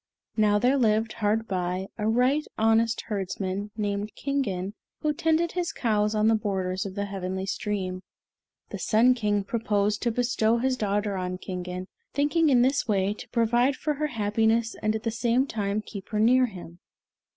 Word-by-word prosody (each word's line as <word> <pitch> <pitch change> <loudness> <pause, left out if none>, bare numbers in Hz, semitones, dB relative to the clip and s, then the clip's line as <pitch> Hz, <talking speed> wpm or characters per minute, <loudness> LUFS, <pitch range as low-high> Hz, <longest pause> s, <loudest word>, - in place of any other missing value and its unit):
Now 210 -2 +3
there 255 +6 +3
lived, 220 -1 +2
hard 225 0 0
by, 185 0 -2
a 210 - 0
right 250 +6 +3
honest 225 +1 +3
herdsman, 195 -1 -3
named 205 0 -2
Kingen, 205 -9 -2 0.3
who 305 -1 +1
tended 325 +2 +1
his 355 -1 -2
cows 215 -2 0
on 215 0 +3
the 225 - +5
borders 190 -3 -1
of 190 - -9
the 200 0 -1
Heavenly 190 -1 -4
Stream. 190 -2 -3 0.7
The - - -5
Sun 235 +4 +4
King 210 -4 0
proposed 210 -1 0
to 235 - +1
bestow 235 -1 +1
his 255 +2 +1
daughter 205 -3 -1
on 185 0 -3
Kingen, 180 0 -5 0.3
thinking 295 +3 +3
in 245 -3 +5
this 270 +2 +1
way 200 -2 +1
to - - -11
provide 240 +3 +2
for 300 +3 -1
her 300 +1 -1
happiness 225 -1 +1
and 215 0 +1
at 220 - -4
the 230 - 0
same 240 +3 +1
time 210 -4 -2
keep 200 -3 -9
her 210 - -1
near 250 +3 +5
him. 175 -4 -11
215 Hz, 175 wpm, -26 LUFS, 200-245 Hz, 0.7 s, the